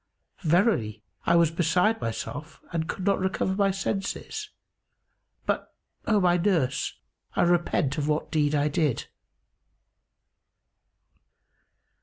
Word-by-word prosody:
Verily, 155 - +2 0.2
I - - +5
was 170 -2 +4
beside 180 +7 +2
myself 145 +7 -5
and 165 0 -1
could 190 - -4
not 200 -1 +3
recover 190 0 0
my 200 0 +2
senses; 195 - -3 1.0
but, - - -2 0.3
O 215 -2 +4
my 180 -2 +4
nurse, 170 -8 0 0.4
I - - +3
repent 170 -4 +2
of 145 - -1
what 150 0 -1
deed 150 -1 +2
I 145 0 +2
did." 150 -4 0
170 Hz, 110 wpm, -27 LUFS, 150-195 Hz, 1.0 s, I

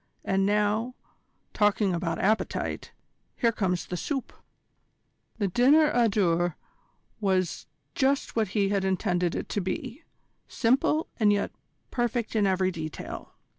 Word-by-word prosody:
And 195 0 +2
now, 210 +4 +1 0.6
talking 205 -2 +2
about 170 -1 -1
appetite, 215 +3 -1 0.4
here 235 - +2
comes 185 -5 -1
the 180 - -5
soup." 270 - -3 1.0
The 205 -3 0
dinner 280 - +5
à 240 -3 +3
deux 175 -4 +1 0.6
was 190 -4 0 0.3
just 275 +1 +1
what 220 -2 +2
he 200 -1 +3
had 200 -1 +1
intended 180 -2 0
it - - -3
to 205 - -1
be, 245 - -4 0.5
simple 270 +6 +2
and 210 -2 +5
yet 205 0 0 0.4
perfect 240 -2 -1
in 210 -2 +3
every 185 0 +1
detail. 160 -3 -7
205 Hz, 130 wpm, -27 LUFS, 185-235 Hz, 1.0 s, dinner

